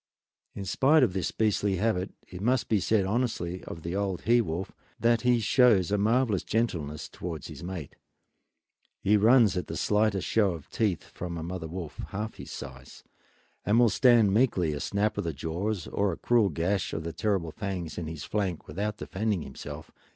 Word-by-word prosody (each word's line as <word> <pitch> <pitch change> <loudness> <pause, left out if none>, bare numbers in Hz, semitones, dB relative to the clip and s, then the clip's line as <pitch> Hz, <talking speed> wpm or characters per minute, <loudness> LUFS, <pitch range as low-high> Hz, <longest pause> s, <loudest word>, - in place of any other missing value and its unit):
Spite 135 - +4
of 105 -8 +2
this 95 -4 -1
beastly 105 -2 +1
habit 95 -1 0 0.2
it 90 0 -9
must 125 +3 +1
be 110 - +3
said 100 +1 +2
honestly 95 -5 -1
of 80 - -8
the 85 +2 -3
old 100 -3 -1
he 120 +1 +4
wolf 90 -2 -4 0.3
that 115 0 +3
he 125 0 +3
shows 110 -5 +4
a 105 - +3
marvelous 110 -1 +2
gentleness 80 -10 -2
towards 80 -4 -6
his - - -9
mate. 90 -5 -6 1.0
He 105 - +3
runs 110 -1 +5
at 90 - -2
the - - -5
slightest 105 -2 +1
show 105 -5 +2
of 80 -3 -10
teeth 105 -7 0
from 85 -1 -6
a 80 - -4
mother 85 -1 -5
wolf 85 -1 -7
half 105 +3 -5
his - - -9
size, 65 0 -9 0.6
and 105 +2 +2
will 120 -1 +6
stand 115 -5 +5
meekly 100 -9 +2
a 75 - -4
snap 105 +6 0
of - - -1
the 85 -2 -2
jaws 85 +6 -3
or 100 -1 0
a 80 - -5
cruel 115 -4 +3
gash 85 +4 -1
of 80 - -3
the 85 0 -5
terrible 95 -3 -1
fangs 90 -5 -4
in 85 - -4
his 80 -1 -6
flank 95 -6 -2
without 105 +7 -3
defending 100 -4 -2
himself. 75 +3 -9
95 Hz, 185 wpm, -28 LUFS, 85-110 Hz, 1.0 s, will